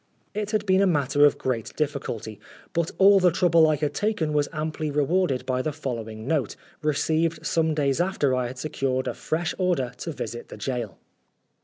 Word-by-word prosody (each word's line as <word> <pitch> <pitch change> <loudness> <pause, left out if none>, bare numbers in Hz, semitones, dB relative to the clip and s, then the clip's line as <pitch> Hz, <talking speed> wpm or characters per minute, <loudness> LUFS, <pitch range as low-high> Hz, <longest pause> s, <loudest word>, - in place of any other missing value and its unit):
It 210 0 -3
had 215 -1 0
been 190 0 +4
a 200 - +4
matter 145 -3 +3
of 145 - +4
great 120 -4 -3
difficulty, 120 -8 -3 0.3
but 170 -1 0
all 195 +1 +7
the 180 -1 +5
trouble 170 -2 +4
I 155 - +3
had 150 0 -2
taken 205 -8 -1
was 145 -1 +1
amply 155 0 -3
rewarded 145 -2 +1
by 130 -1 0
the 155 - -2
following 115 -6 -5
note, 145 -8 0 0.3
received 155 +2 0
some 160 -1 +1
days 140 0 +1
after 175 -7 +1
I 125 -1 0
had 125 +2 -8
secured 130 -2 -2
a - - -1
fresh 165 +2 -2
order 175 -9 +1
to 165 - -4
visit 120 -5 -6
the - - -9
gaol. 115 -3 -4
150 Hz, 185 wpm, -25 LUFS, 130-170 Hz, 0.3 s, all